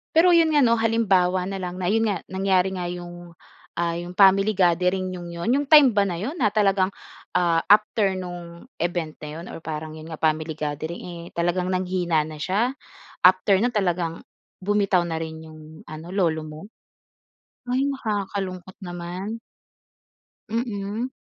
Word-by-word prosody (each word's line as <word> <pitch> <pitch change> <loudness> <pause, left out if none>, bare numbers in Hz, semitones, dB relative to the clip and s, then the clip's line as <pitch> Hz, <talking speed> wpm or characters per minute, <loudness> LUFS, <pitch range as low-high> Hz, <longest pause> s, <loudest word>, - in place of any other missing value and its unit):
Pero 350 +2 +6
'yon 325 -2 +4
nga 290 -2 +5
'no 230 -1 +4
halimbawa 190 -5 +2
na 195 -1 -4
lang 180 -1 -5
na 180 - -1
'yon 225 +1 +2
nga, 200 -3 0
nangyari 190 -1 +2
nga 175 -1 -3
'yong, 175 -1 -8 0.4
ah, 170 -1 0
'yong 175 +1 -7
family 195 +2 +5
gathering 180 +1 +2
ninyong 175 -1 -7
'yon, 170 +7 -3
'yong 285 0 0
time 295 -5 +8
ba 205 -1 +3
na 175 -2 -3
'yon 270 - -4
na 210 - +3
talagang, 195 -2 +2 0.4
ah, 170 -2 +3
after 205 -1 +4
nung 175 -2 -8
event 170 -2 -2
na 150 - -8
'yon 170 - -8
or - - -8
parang 155 -1 -6
'yon 155 +1 -10
nga 160 -2 -8
family 155 0 0
gathering 155 +2 -4
eh, 170 -1 -8
talagang 175 +1 0
nanghina 180 -4 0
na 155 -1 -9
siya? 210 - 0 0.5
After 185 +1 +5
nun 240 +2 +1
talagang, 175 -5 -1 0.3
bumitaw 195 -2 +1
na 160 -1 -3
rin 160 0 -6
'yong 155 0 -12 0.2
ano, 155 +2 -9
lolo 170 -5 0
mo? 155 +1 -9 1.1
Ay 260 +2 +1
nakakalungkot 200 -8 -3
naman. 180 +5 -6 1.1
Mm. 225 0 -2
185 Hz, 160 wpm, -24 LUFS, 170-205 Hz, 1.1 s, time